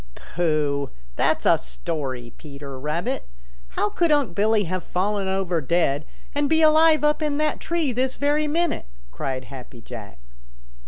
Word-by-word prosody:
"Pooh! 150 -4 -1 0.3
That's - - +1
a - - +5
story, 120 - -5
Peter 140 -2 -8
Rabbit. 150 +5 -2 0.5
How 210 - +2
could 340 +9 +1
Unc' 285 - +2
Billy 210 +2 +3
have 185 0 -3
fallen 195 +2 -1
over 190 -3 0
dead 150 -1 +1 0.3
and 285 0 +1
be 320 0 +4
alive 310 0 +6
up 300 +1 +3
in 295 -2 0
that 305 0 0
tree 335 -5 0
this 255 +2 0
very 295 +1 +1
minute?" 330 - 0 0.2
cried 130 - -3
Happy 125 -3 -10
Jack. 110 - -9
185 Hz, 150 wpm, -24 LUFS, -, 0.5 s, alive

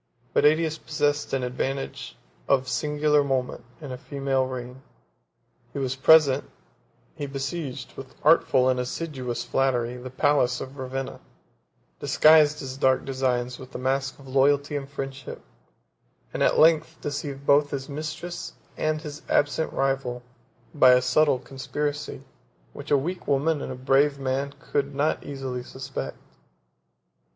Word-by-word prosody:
But - - +3
Ætius 160 +1 +2
possessed 145 -1 0
an 135 -1 0
advantage 135 +2 -4 0.3
of 130 -1 +2
singular 150 0 +2
moment 130 -2 -2 0.2
in 145 -4 -8
a 125 - -6
female 135 -1 -1
reign; 125 0 -7 0.9
he - - -6
was 135 -1 -1
present: 140 0 +5 0.7
he 145 - -4
besieged, 135 -1 -5
with 130 -1 -10
artful 145 -4 +4
and 130 -1 +2
assiduous 125 -3 -4
flattery, 125 -2 0
the 125 +1 -8
palace 125 -1 +2
of 135 +1 -8
Ravenna; 130 0 -4 0.8
disguised 155 -1 +5
his 130 0 -6
dark 130 -1 +2
designs 125 -2 -1
with 130 0 -11
the - - -4
mask 135 +1 -1
of 140 - -15
loyalty 140 +2 +2
and 140 -1 -4
friendship; 135 -1 -6 0.9
and - - -3
at - - +3
length 160 0 +4
deceived 145 -1 -5
both 145 +1 +4
his 135 -1 -4
mistress 155 +4 -6 0.2
and 155 0 -1
his 150 -1 -7
absent 145 +2 +1
rival, 135 -3 -1 0.5
by 130 -4 +7
a 125 - +5
subtle 140 +2 +3
conspiracy, 145 +3 -4 0.5
which - - -9
a 145 - +5
weak 175 +7 -4
woman 145 +2 +1
and - - -5
a - - -5
brave 135 +3 +2
man 135 +1 -2
could 140 -1 -2
not 145 +2 0
easily 135 -3 -5
suspect. 130 - -6
135 Hz, 140 wpm, -25 LUFS, 130-145 Hz, 0.9 s, by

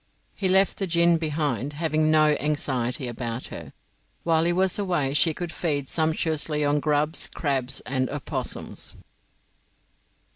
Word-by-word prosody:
He 190 -2 -1
left 190 +1 +3
the 195 - -1
gin 170 0 +3
behind, 150 -3 -2
having 155 0 0
no 155 -1 +5
anxiety 130 -4 -1
about 120 0 -5
her. 80 -4 -8 0.5
While 165 -1 +2
he 175 - +3
was 185 +2 +1
away 175 -9 0
she 160 +3 +3
could 170 +1 -5
feed 145 -7 -2
sumptuously 155 -1 +1
on 145 +1 +2
grubs, 150 +2 +2
crabs, 135 -4 -1
and 130 -1 -2
opossums. 145 -1 -4
150 Hz, 135 wpm, -25 LUFS, 140-165 Hz, 0.5 s, no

